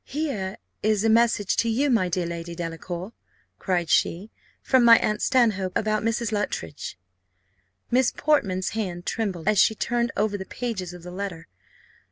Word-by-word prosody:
"Here 240 -10 -3 0.2
is 215 -1 +1
a 225 - +3
message 225 -3 +3
to 230 - +2
you, 270 +5 +1
my 205 -7 +2
dear 175 0 -1
Lady 170 0 -5
Delacour," 175 +4 -5 0.5
cried 180 -3 0
she, 185 +6 +1 0.3
"from 260 -2 +3
my 230 -1 +9
aunt 210 0 -1
Stanhope, 215 -8 +2
about 215 0 0
about 225 - +1
Mrs. 230 -1 -2
Luttridge." 205 - -4 0.9
Miss 255 +1 +3
Portman's 195 -12 +1
hand 180 -5 -4
trembled 195 -6 -3
as 215 -2 +4
she 220 - +5
turned 235 +1 0
over 205 -1 0
the 190 - -6
pages 200 -8 -4
of 180 -1 -11
the 180 - -8
letter. 180 -3 -6
205 Hz, 165 wpm, -25 LUFS, 180-230 Hz, 0.9 s, my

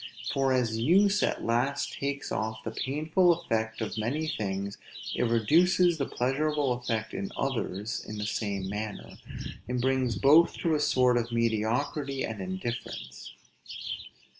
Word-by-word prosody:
For 135 -1 +2
as 120 -4 +1
use 195 - +4
at - - 0
last 120 +5 0
takes 140 0 -3
off 110 0 -2
the 115 - -4
painful 155 +8 +2
effect 110 -8 -2
of 110 0 -3
many 135 +9 -1
things, 100 -7 -3 0.3
it - - +1
reduces 165 - +4
the 140 - 0
pleasurable 140 +1 0
effect 115 -3 -3
in 200 0 -3
others 115 -4 -2
in 110 - -7
the 105 - -3
same 100 -3 -2
manner, 105 +1 -5 0.5
and 125 0 -1
brings 130 -1 +1
both 155 +5 +5
to 165 - +2
a 150 - +2
sort 125 -4 +3
of 120 0 -1
mediocrity 120 +5 0
and 110 -3 -5
indifference. 95 - -5
125 Hz, 140 wpm, -29 LUFS, 110-145 Hz, 0.5 s, both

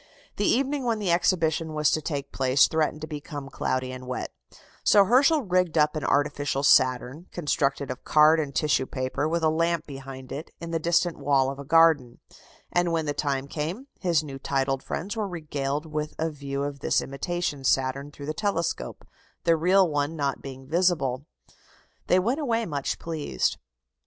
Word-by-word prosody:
The 205 - 0
evening 275 +2 +1
when 235 -2 0
the 200 -5 0
exhibition 165 -2 +1
was 150 -1 +3
to 155 - +1
take 140 -2 -4
place 130 +1 +4
threatened 155 -1 -1
to 155 - -5
become 145 -2 -7
cloudy 130 0 -2
and 130 0 -8
wet, 125 - -4 0.5
so 200 -1 +6
Herschel 275 - +4
rigged 180 -4 +1
up 150 0 +3
an 155 - -3
artificial 145 -1 0
Saturn, 130 +4 +3
constructed 140 -4 -1
of 130 - -8
card 155 +1 +5
and 140 -3 -3
tissue 150 -4 +1
paper, 130 +3 -2
with 170 0 -1
a 160 - +4
lamp 165 +1 0
behind 135 -2 -9
it, 150 +4 -6
in 170 0 -6
the 165 - 0
distant 170 0 +1
wall 135 -1 +2
of 140 - -9
a - - -6
garden; 150 -5 +4 0.5
and, 175 -1 +1
when 165 -1 0
the 145 - -1
time 140 -2 -2
came, 165 - -4
his 170 -4 +1
new 135 -3 -8
titled 135 -1 -1
friends 195 +10 -4
were 215 -2 -2
regaled 150 -4 -3
with 150 -1 -4
a 160 0 -1
view 140 -1 -4
of 140 -1 -4
this - - +1
imitation 145 +1 -3
Saturn 135 +2 +1
through 145 -1 -10
the 155 - -2
telescope 170 -2 -2 0.4
the 165 - +4
real 185 +4 +4
one 150 0 -1
not 140 -3 -2
being 135 -1 -9
visible. 155 -5 +1 0.8
They 180 - +4
went 235 +10 +1
away 230 -6 0
much 145 -6 -2
pleased. 155 - -2
150 Hz, 180 wpm, -26 LUFS, 140-170 Hz, 0.8 s, so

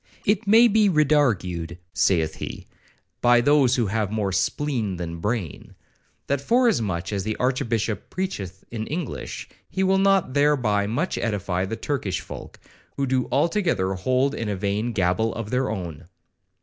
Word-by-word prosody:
—'It 205 +1 +1
may 225 +4 +7
be 215 -2 +4
redargued,' 115 - +1 0.2
saith 80 -4 +1
he, - - -6 0.6
'by 120 0 +5
those 135 -1 +4
who 120 - +1
have 105 0 -1
more 105 -3 -1
spleen 110 +1 -1
than 85 -1 -5
brain, 105 - -4 0.5
that 140 -1 -1
forasmuch 115 - +1
as 100 -2 -1
the 110 +1 -2
Archbishop 115 -5 -1
preacheth 100 - -4
in 110 -1 -4
English, 160 -2 -5 0.2
he 190 - -1
will 190 0 +3
not 195 -8 +3
thereby 125 -9 +2
much 140 - -1
edify 95 -4 -1
the 95 - -4
Turkish 110 -5 -2
folk, - - -10 0.4
who 140 - +1
do 130 -1 0
altogether 145 - +1
hold 130 +8 +1
in 115 -6 -3
a 100 - -1
vain 100 +4 -1
gabble 95 +2 0
of 115 -2 -5
their 130 +1 +1
own.' 85 -6 -5
115 Hz, 150 wpm, -24 LUFS, 95-145 Hz, 0.6 s, may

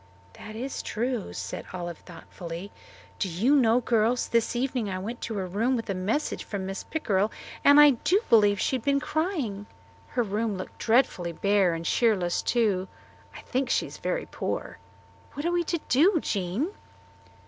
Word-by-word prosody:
"That 215 0 -10
is 255 +4 -4
true," 240 -1 -2
said - - -6
Olive 175 -2 -5
thoughtfully. 175 +1 -9 0.5
"Do 190 - 0
you 220 - +2
know, 245 -3 +4
girls, 230 +1 +1
this 230 +1 +1
evening 245 -3 -1
I 185 - -3
went 225 +6 -5
to 225 - -4
her 195 -2 -2
room 220 +8 0
with 225 -4 -3
a - - 0
message 200 +11 -1
from 200 -2 -4
Mrs. 195 +1 -6
Pickrell, 210 -9 +1 0.3
and 285 +1 +8
I 295 -1 +9
do 350 - +2
believe 205 -3 +5
she 260 - +1
had 235 - -10
been 280 0 +2
crying. 280 - -2 0.5
Her 245 - +4
room 210 0 -1
looked 185 - -8
dreadfully 220 -8 +2
bare 200 -1 +2
and 165 0 -6
cheerless, 195 -7 +2
too. 205 -6 +1 0.5
I - - -9
think 260 0 -2
she - - +2
is - - -9
very - - -2
poor. - - -4 0.5
What 290 +3 -5
are 345 - +2
we 350 0 +1
to 340 - 0
do, 335 +9 +4
Jean?" 205 - -2
225 Hz, 175 wpm, -27 LUFS, 195-260 Hz, 0.5 s, I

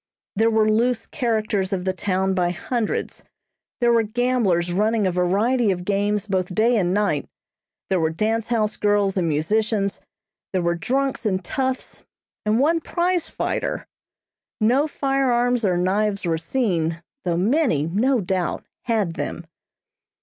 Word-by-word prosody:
There 225 +3 +3
were 220 -1 +3
loose 230 +2 +1
characters 215 -6 -1
of 185 -2 -2
the 190 - +1
town 190 +1 0
by 180 -2 +1
hundreds; 220 +6 -3 0.6
there 240 0 +4
were 230 - +4
gamblers 215 -7 +1
running 215 +2 +2
a 185 - +2
variety 205 +7 +2
of 180 -2 -1
games 205 +1 0
both 185 -3 -2
day 235 +3 +3
and 180 -5 +1
night; 205 +1 0 0.6
there 190 -2 +1
were 160 -1 +2
dance 215 +7 -1
house 220 -3 0
girls 205 -2 +2
and 180 -3 +1
musicians; 200 +6 0 0.5
there 185 - +1
were 170 0 +2
drunks 265 +10 -1
and 185 -3 -1
toughs, 260 +6 -3 0.5
and 215 +2 +3
one 325 +5 +3
prize 350 +1 0
fighter. - - -2 0.7
No 250 +7 +3
firearms 250 -4 +1
or 185 -3 +2
knives 195 +2 0
were 165 -2 0
seen, 170 -5 -1 0.2
though 175 -3 0
many, 210 - +2
no 225 +9 +1
doubt, 185 -1 -2 0.2
had 215 -8 0
them. 170 - -5
210 Hz, 145 wpm, -22 LUFS, 185-240 Hz, 0.7 s, there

